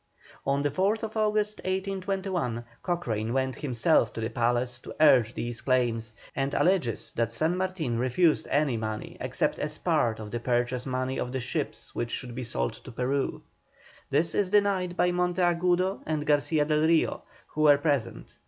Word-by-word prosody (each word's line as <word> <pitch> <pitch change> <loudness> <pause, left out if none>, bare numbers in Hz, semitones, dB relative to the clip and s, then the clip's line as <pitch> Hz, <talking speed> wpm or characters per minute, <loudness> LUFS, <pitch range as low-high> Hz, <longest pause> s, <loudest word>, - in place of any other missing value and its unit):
On 140 +1 +1
the 145 - +1
4th 215 - 0
August, 215 -1 +1
1821, 190 - -2 0.2
Cochrane 120 - -2
went 130 -1 0
himself 135 +3 +2
to - - -6
the 110 - -2
palace 120 0 0
to - - -10
urge 125 -7 +5
these 120 0 -4
claims, 115 -4 0 0.2
and 135 +1 -1
alleges 175 -11 +1
that 115 0 -1
San 160 +9 +1
Martin 180 -10 -1
refused 150 +6 +2
any 140 -4 +2
money 110 -1 -4
except - - -1
as - - -3
part 110 -2 +1
of 105 -1 -7
the 120 - -2
purchase 120 +1 0
money 130 0 -2
of 125 - -3
the 130 - -2
ships 120 - -4
which 120 - -2
should 125 0 -5
be 130 - -5
sold 60 - -1
to - - -12
Peru. 130 +4 -1 0.7
This 160 +4 +2
is 200 -3 +1
denied 190 -3 +2
by 180 - +3
Monteagudo 180 +1 +1
and 155 -1 -1
Garcia 150 +1 +2
del 155 +1 +2
Rio, 165 -1 +2 0.3
who 155 - -3
were 145 -2 +7
present. 145 -5 -2
140 Hz, 165 wpm, -28 LUFS, 120-180 Hz, 0.7 s, were